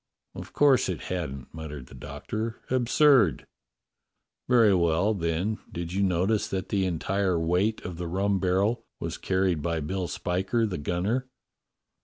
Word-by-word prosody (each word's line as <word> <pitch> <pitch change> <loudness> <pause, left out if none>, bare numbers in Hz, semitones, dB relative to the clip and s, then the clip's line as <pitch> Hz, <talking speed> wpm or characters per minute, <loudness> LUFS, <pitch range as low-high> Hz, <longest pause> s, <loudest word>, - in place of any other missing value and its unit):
"Of - - -9
course 140 -7 +4
it 90 - -2
hadn't," 70 -7 -5
muttered 75 -4 -7
the 65 - -16
Doctor. 75 - -5
"Ab 125 -2 +1
surd!" 125 - +4 1.0
"Very 115 -5 +6
well, 85 +4 +2
then, 90 +3 -1
did 85 0 -5
you 100 - 0
notice 95 +3 +1
that 95 -1 -4
the 95 -2 +1
entire 95 +1 0
weight 90 +7 +1
of 90 -2 -6
the 90 - -3
rum 95 +3 0
barrel 100 +6 +1 0.2
was - - -4
carried 95 -4 +1
by 85 +1 -1
Bill 90 +4 -3
Spiker, 95 +8 -1
the 95 -6 -3
gunner. 100 - -1
95 Hz, 150 wpm, -27 LUFS, 85-105 Hz, 1.0 s, Very